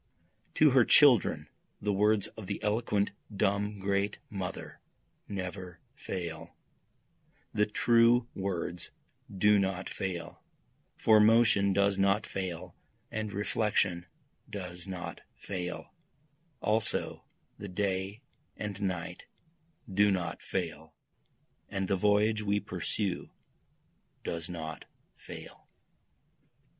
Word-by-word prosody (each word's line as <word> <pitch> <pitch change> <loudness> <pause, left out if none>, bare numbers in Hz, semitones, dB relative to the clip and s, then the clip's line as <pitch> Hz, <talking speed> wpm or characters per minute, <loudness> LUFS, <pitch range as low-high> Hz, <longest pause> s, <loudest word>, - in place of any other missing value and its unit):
To 155 -2 +6
her 130 -1 +6
children 125 - +5 0.3
the 105 0 0
words 105 +1 +3
of 110 -4 -10
the 100 - -3
eloquent 105 -1 +1 0.3
dumb 105 +1 +1
great 100 +1 0
mother 95 -3 -5 0.5
never 90 -2 -5
fail, 85 -4 -6 1.0
The 105 - +2
true 115 +2 +4
words 90 -3 -3 0.4
do 105 +2 +4
not 95 -1 -1
fail, 90 -3 -5 0.6
for 110 -1 +6
motion 105 -2 +5
does 100 0 +2
not 100 +2 +3
fail 90 -2 -5 0.4
and 110 -1 -3
reflection 100 -3 0 0.4
does 90 -2 -6
not 90 -3 -6
fall, 90 -3 -5 0.7
Also 110 +2 0 0.4
the 100 - -6
day 95 +4 -2 0.3
and 105 -1 -5
night 95 -4 -3 0.6
do 105 0 +4
not 90 -4 -1
fall, - - -4 0.7
and 95 -1 -2
the 100 - +2
voyage 105 +3 +3
we 105 0 +1
pursue 95 +1 -3 0.9
does 85 0 -4
not 80 -4 -6 0.3
fall. - - -11
100 Hz, 100 wpm, -31 LUFS, 90-105 Hz, 1.0 s, To